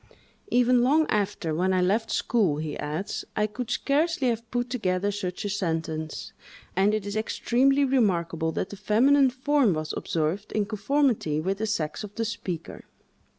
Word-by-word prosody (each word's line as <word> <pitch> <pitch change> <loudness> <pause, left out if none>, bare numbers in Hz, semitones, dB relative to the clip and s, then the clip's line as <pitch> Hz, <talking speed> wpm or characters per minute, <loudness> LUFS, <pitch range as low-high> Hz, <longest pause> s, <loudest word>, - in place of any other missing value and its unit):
"Even 245 0 +4
long 300 +6 +4
after, 195 -6 -1
when 185 +4 +1
I 185 - +2
left 220 +5 +1
school," 195 -11 +1
he 155 -1 -4
adds, 155 +7 -3
"I 210 - +2
could 220 +3 -5
scarcely 285 +1 +1
have 230 0 -3
put 245 +1 -1
together 200 -4 0
such 195 0 -4
a - - -1
sentence; 160 -5 -3 0.4
and 200 +3 +3
it 215 -2 -3
is 205 0 -4
extremely 265 +5 +2
remarkable 170 -11 +1
that 185 - -3
the 205 - -8
feminine 265 +7 +4
form 260 - +2
was 155 0 -3
observed 170 +6 -2
in 210 -1 +1
conformity 215 - +1
with 190 +5 -2
the 220 - -1
sex 165 -3 -2
of 205 -1 -9
the 230 - -1
speaker." 185 -7 -5
210 Hz, 165 wpm, -26 LUFS, 180-245 Hz, 0.4 s, Even